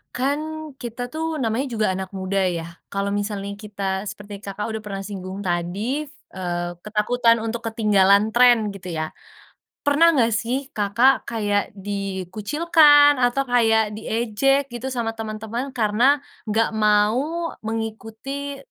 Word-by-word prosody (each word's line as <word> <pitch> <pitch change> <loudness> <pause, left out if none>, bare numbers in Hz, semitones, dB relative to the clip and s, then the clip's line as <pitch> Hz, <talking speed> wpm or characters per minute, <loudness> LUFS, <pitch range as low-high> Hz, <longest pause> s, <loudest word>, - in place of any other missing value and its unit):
Kan, 275 +4 0 0.4
kita, 240 0 -6
tuh, 320 0 -3
namanya 230 +5 0
juga 220 -5 0
anak 190 0 -4
muda, 190 +1 -1
ya, 170 -2 -2 0.2
kalau 200 0 -2
misalnya 205 -1 -3
kita, 210 -2 -8 0.2
seperti 205 +1 -8
Kakak 200 0 -6
udah 220 - -3
pernah 200 -2 -6
singgung 195 0 -6
tadi, 195 - -2
eee, 175 - -5
ketakutan 230 +4 +2
untuk 225 +1 -3
ketinggalan 210 -2 +3
tren, 240 -3 +5
gitu, 185 -3 -7
ya. 155 0 -3 0.7
Pernah 290 +4 +5
enggak, 235 -8 +3
sih, 260 +5 -2
Kakak 225 +6 +3
kayak 205 -3 0
dikucilkan 220 - +3
atau 245 +3 +2
kayak 225 -4 +3
diejek, 240 +5 0
gitu, 240 +2 -4
sama 235 -3 -2
teman-teman, 225 +3 -5
karena 240 +4 +3 0.3
enggak 220 +2 +2
mau 220 +11 +1
mengikuti 225 +5 -5
220 Hz, 130 wpm, -22 LUFS, 200-255 Hz, 0.7 s, tren